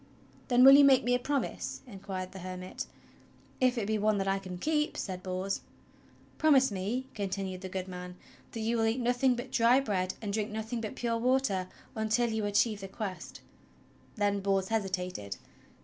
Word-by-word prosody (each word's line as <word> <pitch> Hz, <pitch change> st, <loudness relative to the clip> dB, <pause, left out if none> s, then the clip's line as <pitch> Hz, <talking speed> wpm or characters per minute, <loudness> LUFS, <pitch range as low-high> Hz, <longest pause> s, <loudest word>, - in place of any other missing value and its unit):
"Then 245 Hz, -1 st, +5 dB
will 270 Hz, -, +11 dB
you 285 Hz, +1 st, +9 dB
make 270 Hz, -2 st, +6 dB
me 245 Hz, -, +2 dB
a 245 Hz, -, +3 dB
promise?" 280 Hz, +2 st, -2 dB
inquired 190 Hz, -4 st, -6 dB
the 190 Hz, -, -9 dB
hermit. 185 Hz, 0 st, -6 dB, 0.7 s
"If 255 Hz, -1 st, +3 dB
it 220 Hz, -, 0 dB
be 215 Hz, +1 st, 0 dB
one 210 Hz, 0 st, +2 dB
that 195 Hz, 0 st, -1 dB
I 195 Hz, 0 st, +1 dB
can 185 Hz, -2 st, -7 dB
keep," 300 Hz, -, 0 dB
said 185 Hz, -2 st, -4 dB
Bors. 185 Hz, +1 st, -2 dB, 0.8 s
"Promise 275 Hz, -5 st, +5 dB
me," 205 Hz, +7 st, -2 dB
continued 195 Hz, -2 st, -3 dB
the 190 Hz, -, -6 dB
good 185 Hz, 0 st, -4 dB
man, 180 Hz, -1 st, -7 dB, 0.4 s
"that 225 Hz, -, -4 dB
you 230 Hz, +2 st, 0 dB
will 225 Hz, -, +2 dB
eat 225 Hz, +3 st, +1 dB
nothing 245 Hz, +1 st, +2 dB
but 245 Hz, +2 st, -6 dB
dry 250 Hz, 0 st, +5 dB
bread 190 Hz, -8 st, -1 dB
and 205 Hz, -2 st, -4 dB
drink 215 Hz, 0 st, -1 dB
nothing 220 Hz, +2 st, -4 dB
but 215 Hz, -, -5 dB
pure 230 Hz, -1 st, -1 dB
water 250 Hz, -7 st, +1 dB, 0.3 s
until 220 Hz, +2 st, +1 dB
you 220 Hz, -1 st, -1 dB
achieve 205 Hz, +1 st, +1 dB
the 195 Hz, -, -5 dB
Quest." 195 Hz, -1 st, -6 dB, 0.7 s
Then 205 Hz, -2 st, +1 dB
Bors 195 Hz, -1 st, 0 dB
hesitated. 185 Hz, -, -2 dB
215 Hz, 180 wpm, -30 LUFS, 190-245 Hz, 0.8 s, will